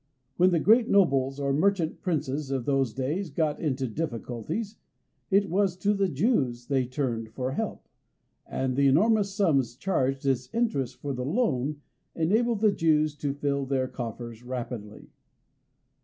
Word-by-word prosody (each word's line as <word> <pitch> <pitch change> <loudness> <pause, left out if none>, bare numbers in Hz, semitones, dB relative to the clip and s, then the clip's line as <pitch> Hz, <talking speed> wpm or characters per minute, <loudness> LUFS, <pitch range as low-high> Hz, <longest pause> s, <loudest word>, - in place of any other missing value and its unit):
When 180 +1 +5
the 175 -2 +2
great 225 +7 +4
nobles 135 -8 +3
or 140 -1 0
merchant 170 +1 +1
princes 150 -5 -2
of 135 -3 -2
those 135 -4 +1
days 150 - -2
got 150 +1 -1
into 135 -4 -1
difficulties, 150 - -4 0.5
it 200 0 +3
was 190 0 +1
to 205 +3 +1
the 195 -2 +1
Jews 135 - 0
they 135 -2 0
turned 120 -4 -2
for 130 0 -2
help, - - -4 0.6
and 130 -1 -2
the 140 +1 +4
enormous 200 +8 +3
sums 140 - +1
charged 135 -4 -1
as 130 -2 0
interest 140 - 0
for 140 +2 -4
the 125 0 -3
loan 145 - 0 0.3
enabled 215 +7 +1
the 215 -2 +5
Jews 155 -4 +2
to 140 -1 -2
fill 140 -1 -1
their 130 -1 0
coffers 120 -2 -6
rapidly. 120 -4 -6
140 Hz, 150 wpm, -27 LUFS, 130-185 Hz, 0.6 s, When